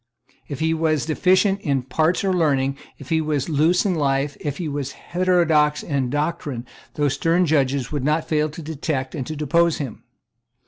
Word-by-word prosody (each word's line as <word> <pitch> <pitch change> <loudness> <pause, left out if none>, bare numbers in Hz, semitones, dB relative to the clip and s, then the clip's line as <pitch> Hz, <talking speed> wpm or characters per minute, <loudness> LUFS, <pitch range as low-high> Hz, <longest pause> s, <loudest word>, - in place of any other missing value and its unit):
If 140 -1 -6
he 160 0 +2
was 155 -3 0
deficient 190 +5 +2
in 140 -7 0
parts 160 +8 +1
or 190 -1 +1
learning, 140 -6 +1 0.2
if 140 - -12
he 160 -1 +2
was 150 -2 -1
loose 160 +5 +2
in 195 - +2
life, 140 -2 0
if 145 -2 -4
he 175 - -3
was 140 -2 -4
heterodox 170 -5 +2
in 140 -5 -1
doctrine, 145 -4 -2 0.3
those 145 -2 +1
stern 170 +2 +2
judges 140 -4 +1
would 145 -4 -2
not 155 +3 +1
fail 155 0 +1
to 160 +2 -9
detect 145 -3 -3
and 135 -5 -4
to 155 - -4
depose 165 +3 +2
him. 135 -7 -6
150 Hz, 180 wpm, -22 LUFS, 140-165 Hz, 0.3 s, he